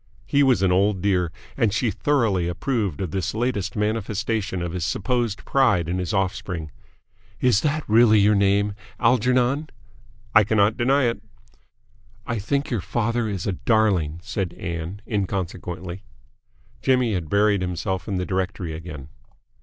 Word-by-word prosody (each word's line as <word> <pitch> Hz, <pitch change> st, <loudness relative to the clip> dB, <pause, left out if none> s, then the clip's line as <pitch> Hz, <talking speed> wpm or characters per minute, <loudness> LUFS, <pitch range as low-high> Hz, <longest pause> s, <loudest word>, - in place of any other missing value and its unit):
He 140 Hz, +7 st, +2 dB
was 130 Hz, -7 st, +4 dB
an 95 Hz, -, +3 dB
old 95 Hz, +2 st, +2 dB
dear, 90 Hz, -3 st, +1 dB, 0.2 s
and 115 Hz, -6 st, +2 dB
she 110 Hz, +2 st, 0 dB
thoroughly 110 Hz, -13 st, +1 dB
approved 100 Hz, -, -2 dB
of 90 Hz, -5 st, -3 dB
this 95 Hz, +2 st, -2 dB
latest 115 Hz, -4 st, -1 dB
manifestation 105 Hz, -2 st, -1 dB
of 85 Hz, -, -3 dB
his 90 Hz, -1 st, -3 dB
supposed 120 Hz, +3 st, -1 dB
pride 115 Hz, -, +2 dB
in 90 Hz, +2 st, -1 dB
his 90 Hz, +1 st, -2 dB
offspring. 90 Hz, -5 st, -2 dB, 0.7 s
"Is 125 Hz, -5 st, +3 dB
that 155 Hz, 0 st, -1 dB
really 110 Hz, 0 st, +6 dB
your 105 Hz, +1 st, +5 dB
name 100 Hz, +1 st, +2 dB, 0.3 s
Algernon?" 125 Hz, +5 st, +2 dB, 0.6 s
"I 110 Hz, -, +7 dB
cannot 105 Hz, +1 st, +2 dB
deny 135 Hz, +4 st, +2 dB
it." 115 Hz, -4 st, 0 dB, 1.0 s
"I 115 Hz, -, -2 dB
think 140 Hz, +8 st, -1 dB
your 115 Hz, -5 st, 0 dB
father 115 Hz, +3 st, -1 dB
is 95 Hz, -4 st, -4 dB
a 100 Hz, -, 0 dB
darling," 95 Hz, -6 st, +1 dB
said 95 Hz, -4 st, -3 dB
Ann 85 Hz, +4 st, -5 dB
inconsequently. 95 Hz, -3 st, -3 dB, 0.8 s
Jimmy 125 Hz, -4 st, +2 dB
had 85 Hz, -5 st, -3 dB
buried 100 Hz, -1 st, +3 dB
himself 90 Hz, +1 st, -3 dB
in 100 Hz, -, -2 dB
the 90 Hz, 0 st, -1 dB
directory 95 Hz, -2 st, -2 dB
again. 80 Hz, -4 st, -8 dB
100 Hz, 145 wpm, -23 LUFS, 90-115 Hz, 1.0 s, I